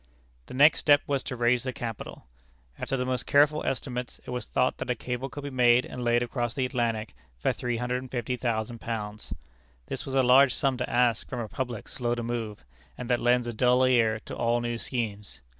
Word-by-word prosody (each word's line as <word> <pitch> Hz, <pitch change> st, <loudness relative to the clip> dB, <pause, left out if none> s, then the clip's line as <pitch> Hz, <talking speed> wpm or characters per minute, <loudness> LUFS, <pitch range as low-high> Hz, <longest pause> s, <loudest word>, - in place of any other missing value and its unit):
The -, -, -8 dB
next 145 Hz, +4 st, +6 dB
step 145 Hz, -1 st, +5 dB
was 140 Hz, -2 st, 0 dB
to 125 Hz, -, -4 dB
raise 120 Hz, 0 st, +2 dB
the 130 Hz, -, -3 dB
capital. 115 Hz, -, -7 dB, 0.5 s
After 135 Hz, -, -2 dB
the 125 Hz, -, -1 dB
most 130 Hz, -1 st, -2 dB
careful 150 Hz, +2 st, +4 dB
estimates, 125 Hz, -2 st, -4 dB
it -, -, -7 dB
was 125 Hz, 0 st, -4 dB
thought 130 Hz, 0 st, +1 dB
that -, -, -4 dB
a 125 Hz, -, +1 dB
cable 125 Hz, +2 st, -4 dB
could 145 Hz, +3 st, -8 dB
be 140 Hz, -, -5 dB
made 125 Hz, -1 st, +4 dB
and 125 Hz, -, -6 dB
laid 120 Hz, 0 st, +3 dB
across 120 Hz, -1 st, -3 dB
the 130 Hz, -, 0 dB
Atlantic 115 Hz, -4 st, -1 dB, 0.2 s
for -, -, +1 dB
£350,000. 120 Hz, -3 st, -3 dB, 0.5 s
This -, -, -5 dB
was 135 Hz, -, -5 dB
a 135 Hz, -, +4 dB
large 130 Hz, +1 st, +6 dB
sum 135 Hz, -1 st, +1 dB
to 125 Hz, -, -3 dB
ask 120 Hz, -2 st, +2 dB
from 125 Hz, -, -4 dB
a 115 Hz, -, -3 dB
public 120 Hz, 0 st, -5 dB
slow 120 Hz, -1 st, -2 dB
to 120 Hz, -, -4 dB
move, 115 Hz, -, -4 dB, 0.3 s
and 125 Hz, 0 st, -4 dB
that 120 Hz, -, +2 dB
lends 120 Hz, 0 st, +3 dB
a 120 Hz, -, -4 dB
dull 125 Hz, +3 st, +4 dB
ear 115 Hz, -4 st, +3 dB
to -, -, -6 dB
all 120 Hz, +1 st, +1 dB
new 120 Hz, -1 st, -3 dB
schemes. 105 Hz, -, -4 dB
125 Hz, 200 wpm, -27 LUFS, 115-130 Hz, 0.5 s, next